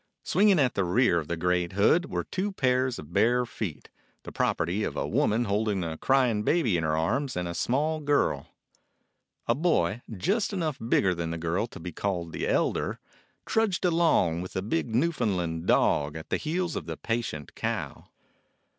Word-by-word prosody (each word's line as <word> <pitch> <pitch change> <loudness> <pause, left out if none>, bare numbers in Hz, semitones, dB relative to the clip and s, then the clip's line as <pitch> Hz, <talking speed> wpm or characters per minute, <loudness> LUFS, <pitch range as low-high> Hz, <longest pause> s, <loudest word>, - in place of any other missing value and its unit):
Swinging 200 +1 +4
at 135 -5 +2
the 100 - 0
rear 90 0 +3
of 75 - -6
the 85 - -2
great 90 +1 0
hood 160 - +3
were - - -2
two 195 +2 -3
pairs 130 -6 +1
of 75 +3 -10
bare 120 +5 +3
feet, 100 -9 -6 0.4
the - - -8
property 90 +6 0
of - - -3
a - - -1
woman 115 +3 +1
holding 105 -2 0
a 80 -1 -3
crying 125 +1 +2
baby 120 - +2
in 80 - 0
her 80 0 +1
arms 125 - 0
and 90 -1 -2
of - - -3
a - - -5
small 150 - 0
girl. 145 -1 +1 1.0
A 115 - +3
boy, 140 - +1 0.2
just 200 - 0
enough 160 -7 -2
bigger 100 -5 +2
than 85 -1 -3
the 85 - -3
girl 85 +7 -1
to - - -11
be 90 +2 -6
called 85 -2 -3
the - - -3
elder, - - 0 0.5
trudged 215 -5 +1
along 165 - +3
with 90 - -8
a 95 - -1
big 90 -4 -1
Newfoundland 100 - 0
dog 75 +1 +2
at 80 - -10
the - - +2
heels 170 +2 -2
of - - -5
the - - -5
patient 115 - -3
cow. - - -4
110 Hz, 185 wpm, -27 LUFS, 85-145 Hz, 1.0 s, Swinging